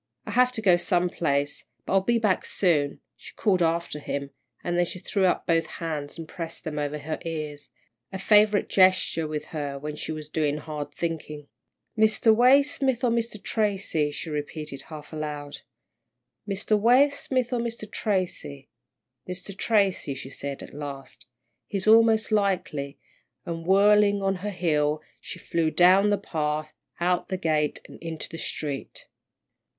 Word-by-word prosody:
"I - - -5
have 250 0 +4
to 220 -3 -3
go 180 -4 +6
some 180 -1 +1
place, 145 -3 -1 0.2
but - - -2
I'll 195 - +5
be 235 +4 +2
back 210 -5 +1
soon," 150 -7 +1
she - - -13
called 190 -5 +2
after 165 -2 0
him, 140 -1 -4 0.3
then 175 0 +1
she 175 - -5
threw 190 +2 0
up 180 - +1
both 165 -1 +2
hands 155 -3 -4
and 165 -1 -7
pressed 165 -1 -6
them 150 -2 -4
over 145 0 -2
her 155 +2 -5
ears, 150 -3 -5 0.4
a 190 - -4
favourite 210 +1 +4
gesture 185 -4 +3
with 150 -1 -4
her 145 -3 -3
when 150 +2 -5
she 155 - -5
was 155 -1 -6
doing 150 -1 0
hard 150 -1 -6
thinking. 150 -3 -5 0.5
"Mr. 220 0 +4
Waysmith 265 0 +4
or 245 - +3
Mr. 230 -2 -1
Tracy," 200 -8 0
she 150 +2 -6
repeated, 150 -1 -5
half 155 -1 -10
aloud. 150 -1 -5 0.9
"Mr. 200 +2 0
Waysmith 255 +1 +3
or 245 - +1
Mr. 230 -2 -4
Tracy. 180 -9 -2 0.6
Mr. 180 +2 -7
Tracy," 200 -9 +1
she 135 0 -8
said, 140 0 -6
at - - -12
last, 140 -2 -8 0.4
"he's 195 -2 -3
most 225 0 +5
likely," 185 -9 0 0.5
and 165 0 -5
whirling 205 +1 +5
on 195 -1 +1
her 205 +3 -4
heel, 155 -5 0 0.2
she - - -8
flew 165 -1 0
down 185 +5 +5
the 205 - +2
path, 155 -4 -3 0.3
out 180 +1 0
the 190 - -1
gate, 155 -4 0
and - - -13
into 165 -1 -4
the 165 - -8
street. 145 -3 -5
170 Hz, 155 wpm, -26 LUFS, 150-205 Hz, 0.9 s, go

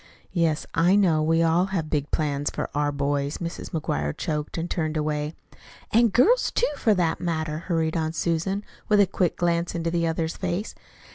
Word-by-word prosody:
"Yes, 165 -4 +1
I 175 +4 +4
know. 175 -6 +3
We 165 +2 +3
all 165 +2 +3
have 185 -5 -3
big 145 -1 0
plans 145 -2 0
for - - -4
our 145 0 +1
boys." 140 0 -1
Mrs. 170 0 -5
McGuire 75 - -2
choked 150 0 -3
and 165 +1 -2
turned 155 -3 -2
away. 150 0 -2 0.6
"An' 235 +2 +6
girls, 255 - +4
too, - - +1
for 220 -6 +2
that 170 -3 0
matter," 160 -3 -2
hurried 165 -2 -1
on 160 -1 0
Susan, 170 +5 -1 0.3
with 210 -1 +5
a 200 - +7
quick 180 -2 0
glance 170 0 0
into 165 0 -1
the 170 -1 +1
other's 160 0 -1
face. 185 +3 -3
165 Hz, 185 wpm, -25 LUFS, 155-175 Hz, 0.6 s, a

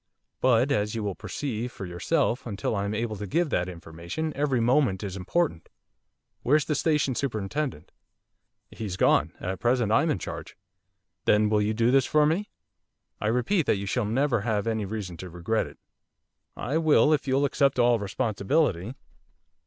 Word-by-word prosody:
But, 130 +2 +3
as 105 -4 0
you 110 - -2
will 100 -2 -2
perceive 120 +2 -4
for 95 - -7
yourself, 120 - -1
until 105 0 -2
I 100 0 -1
am 100 +1 -2
able 110 0 -2
to 105 +1 -5
give 170 - 0
that 90 +1 0
information 85 - -5
every 140 -3 +1
moment 115 -5 +2
is 95 -2 -4
important. 100 - -1 0.7
Where's 145 +2 +3
the 155 - 0
Station 150 -2 +1
Superintendent?' 115 - -3 0.8
'He's 100 -5 -5
gone. 75 -3 +3
At 95 0 -4
present 120 -3 +1
I'm 160 +9 +3
in 150 - +1
charge.' - - -7 0.7
'Then 105 0 +4
will 105 -1 +2
you 105 +1 0
do 115 +2 +3
this 135 -1 +4
for 150 -1 +4
me? 175 +7 0 0.7
I 105 - -1
repeat 125 - +1
that - - +3
you 100 - -4
shall 110 +3 0
never 120 +1 +1
have 110 -2 -1
any 110 -2 -1
reason 95 -4 -5
to 90 +2 -8
regret 90 +6 -1
it.' - - -14 0.8
'I 140 +8 -1
will 155 -1 +4
if 145 -2 0
you'll 135 +2 +2
accept 140 -1 +2
all 120 -1 +4
responsibility. 105 - 0
115 Hz, 170 wpm, -26 LUFS, 100-140 Hz, 0.8 s, Then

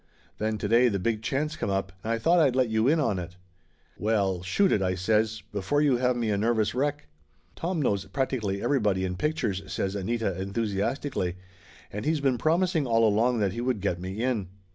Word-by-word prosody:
Then 110 0 -1
to 105 - -3
day 120 +3 +5
the 100 -4 0
big 110 +3 -1
chance 150 +7 -1
come - - -3
up 95 -1 -1
and 115 - -2
I 115 - +1
thought 170 +10 +3
I'd 140 -6 +3
let 130 -3 +2
you 110 +2 +2
in 160 +3 +4
on 105 -10 +1
it." 90 0 -7 0.6
"Well 100 -4 +1
shoot 185 - +2
it," 100 - +2
I 90 -1 0
says, 110 +2 0
"before 105 +8 0
you 145 -4 +3
have 125 0 +1
me 115 -3 -1
a 100 - 0
nervous 110 -1 +1
wreck." 145 +3 -1 0.5
"Tom 170 0 -2
knows 100 -9 +1
practically 115 -8 -2
everybody 105 -9 +1
in 90 -1 -3
pictures," 115 -6 -1
says 95 0 -1
Anita 100 -2 -2
enthusiastically. 100 0 -2 0.6
"And 105 +1 -4
he's 155 +2 +1
been 135 -4 +1
promising 165 0 +1
all 115 -1 +4
along 115 +4 +2
that 100 -2 +1
he 115 - -4
would 125 -3 0
get 90 -3 -1
me 95 +5 -4
in. 120 -7 0
110 Hz, 205 wpm, -27 LUFS, 100-130 Hz, 0.6 s, day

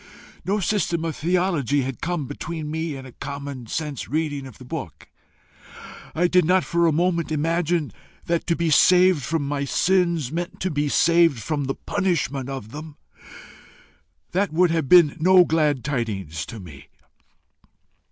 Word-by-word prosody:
No 200 +5 0
system 170 -4 0
of 160 - -3
theology 165 - 0
had 130 -2 -5
come 170 -4 -2
between 150 +3 -6
me 160 -1 -3
and 135 -1 -9
a 130 - -11
common 140 -2 -7
sense 150 +1 -4
reading 145 -2 -2
of 130 - -13
the 130 - -13
book. 125 - -7 1.1
I 175 +2 +3
did 180 0 +4
not 180 +2 +3
for 170 0 +1
a - - +3
moment 170 +1 0
imagine 165 0 0 0.3
that 170 -1 -1
to 170 - +2
be 170 -1 0
saved 180 +1 +5
from 145 +1 -2
my 140 -1 -2
sins 170 -3 +1
meant 170 +2 -4
to 185 - -1
be 145 0 -1
saved 165 -7 +3
from 145 +2 -2
the 135 - -2
punishment 160 -9 -2
of 130 -6 -6
them. 150 +1 -9 1.4
That 195 +1 0
would 175 +2 +3
have 160 -5 -1
been 170 -4 +6
no 180 +2 +6
glad 150 -5 +1
tidings 100 - -3
to 115 - -8
me. 75 -7 -12
155 Hz, 160 wpm, -23 LUFS, 140-170 Hz, 1.4 s, been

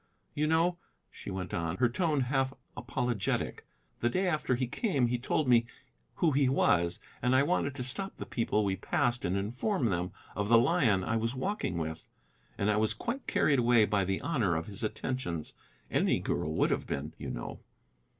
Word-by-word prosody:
"You 150 +1 0
know," 170 +2 +2 0.3
she - - -9
went 95 -2 -4
on, 85 +1 -2
her 120 - +4
tone 150 +3 +1
half 130 +1 0 0.2
apologetic, 120 -3 -2 0.3
"the 120 - +2
day 185 +9 0
after 155 -6 +1
he 130 +1 0
came 140 - 0
he 120 0 0
told 140 +3 0
me 120 -1 +5 0.5
who 165 - +2
he 140 -1 +3
was, 85 -9 +2 0.2
and 125 +1 +3
I 130 - +5
wanted 145 -4 0
to 130 - -3
stop 190 +10 -2
the - - -5
people 110 -3 0
we 95 -1 +1
passed 120 +5 0
and 95 +2 0
inform 125 - -1
them 90 +1 -1 0.2
of 105 0 -1
the 115 - +7
lion 115 - +3
I 115 +4 0
was 115 +3 -1
walking 160 - -2
with. 80 0 -5 0.5
And 100 +1 +2
I 105 - +1
was 110 0 +1
quite 250 +3 -4
carried 140 -3 +3
away 120 -2 +5
by 100 -2 +1
the 95 +1 -1
honor 110 - +1
of 80 0 -2
his 100 -1 -5
attentions: 105 -8 -3 0.4
any - - +2
girl - - -2
would - - +2
have - - -1
been, 75 +3 -4
you - - -5
know." - - -6
120 Hz, 190 wpm, -31 LUFS, 100-140 Hz, 0.5 s, the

